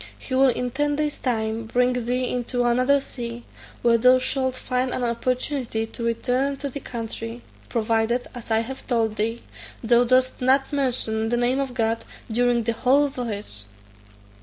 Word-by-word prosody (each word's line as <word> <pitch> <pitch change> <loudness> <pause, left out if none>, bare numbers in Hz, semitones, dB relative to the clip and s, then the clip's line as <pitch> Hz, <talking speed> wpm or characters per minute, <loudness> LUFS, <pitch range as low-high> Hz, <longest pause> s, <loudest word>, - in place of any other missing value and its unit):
He 260 - -7
will 265 +1 +5
in 250 0 0
ten 290 +3 0
days' 300 0 -2
time 225 -2 -1
bring 250 +2 +2
thee 250 +1 -1
into 245 0 -1
another 255 +4 +3
sea, 240 -3 -6 0.4
where 230 -1 +4
thou 250 +2 +6
shalt 260 0 -1
find 255 +1 -1
an 250 - -2
opportunity 245 0 -1
to 225 +1 -7
return 250 +4 0
to 280 0 -4
thy 280 - -6
country, 230 -1 -6 0.3
provided, 230 +1 +1
as 245 -3 -9
I 220 0 +3
have 265 +3 -7
told 225 -3 0
thee, 225 +2 -1 0.4
thou 240 +1 +5
dost 255 +1 +2
not 270 +3 +2
mention 235 -5 0
the 240 - +1
name 245 +2 +2
of 270 -3 -3
God 225 -1 0 0.3
during 240 +1 +2
the 230 +1 0
whole 275 +5 +3
voyage." 210 - -2
245 Hz, 165 wpm, -24 LUFS, 230-260 Hz, 0.4 s, thou